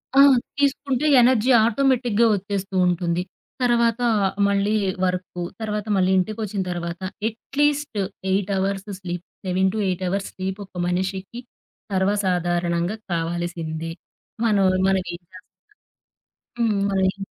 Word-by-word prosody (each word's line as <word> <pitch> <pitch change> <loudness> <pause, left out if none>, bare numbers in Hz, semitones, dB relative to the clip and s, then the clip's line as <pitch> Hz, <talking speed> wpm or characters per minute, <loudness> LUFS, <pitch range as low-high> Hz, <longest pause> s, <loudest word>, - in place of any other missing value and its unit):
ఆ! - - +6 0.4
తీసుకుంటే 280 -1 +1 0.2
ఎనర్జీ 245 0 +3 0.2
ఆటోమేటిక్‌గా 240 -2 +2
వచ్చేస్తూ 195 -1 -3
ఉంటుంది. 175 0 0 0.4
తర్వాత 235 -1 +2 0.5
మళ్ళీ 200 +1 +1 0.3
వర్కు. 180 -1 -3 0.2
తర్వాత 210 -1 -2
మళ్ళీ 190 -1 +3
ఇంటికొచ్చిన 210 +1 -1
తర్వాత, 170 0 -4 0.3
at least 290 +2 -1 0.3
8 195 +1 0
hours 195 +1 -2
sleep. 175 -2 -5 0.2
7-8 190 0 0
hours 195 +2 -2
sleep 190 +1 -4
ఒక 190 - -31
మనిషికి 190 +5 -3 0.5
సర్వసాధారణంగా 180 -1 0 0.2
కావాల్సిందే. 165 -1 -3 0.5
మనోళ్లు 195 -4 +3
మనం 190 -1 +2
ఏం 175 - -7
చేస్తన్నా 185 - -11 1.2
హ్మ్, 215 -4 +2
అది. 190 0 +1
195 Hz, 105 wpm, -23 LUFS, 180-220 Hz, 1.2 s, ఆ